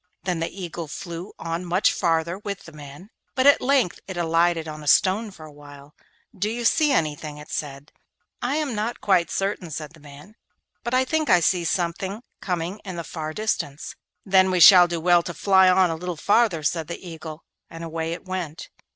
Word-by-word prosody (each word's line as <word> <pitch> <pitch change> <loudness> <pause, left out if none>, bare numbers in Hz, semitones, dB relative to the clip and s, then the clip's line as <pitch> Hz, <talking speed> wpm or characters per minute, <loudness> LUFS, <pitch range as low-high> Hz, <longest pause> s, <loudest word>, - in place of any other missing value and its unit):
Then 180 -3 -2
the 165 - -2
Eagle 175 -3 -7
flew 170 +5 -7
on 165 +1 -4
much 180 +3 +2
farther 170 +2 0
with 200 -2 -6
the - - -12
man, 150 +7 -12 0.2
but 260 0 +1
at 285 - +6
length 255 -8 +1
it 190 -2 -6
alighted 165 -1 +1
on 155 0 -7
a 150 - -10
stone 200 +8 +3
for 165 -5 -12
a 155 - -12
while. 145 0 -14 0.4
'Do 205 +3 -1
you 235 +1 -4
see 305 +4 +3
anything?' 150 - -1
it 150 - -12
said. 140 -1 -5 0.5
'I 245 +4 -1
am 300 -4 -1
not 220 +3 -3
quite 185 -4 +2
certain,' 195 -3 -2
said 155 0 -6
the 165 - -17
man, 145 +6 -14 0.5
'but 240 +2 -1
I 260 +1 +3
think 315 +2 -1
I 180 - +6
see 175 +1 +1
something 185 +6 -2 0.2
coming 180 +2 -3
in 185 -3 -7
the 170 - -5
far 155 -1 -6
distance.' 155 -7 -3 0.3
'Then 190 -1 +4
we 185 -1 +1
shall 180 -1 +9
do 170 -1 -3
well 175 +1 +4
to 175 0 -7
fly 190 -2 +5
on 185 -1 +4
a - - -2
little 175 0 -5
farther,' 200 -2 +2
said 160 +1 -1
the 170 +2 -8
Eagle, 160 -1 -9 0.3
and 165 0 -9
away 165 0 -4
it 170 - -9
went. 180 -4 -5
175 Hz, 205 wpm, -23 LUFS, 160-195 Hz, 0.5 s, shall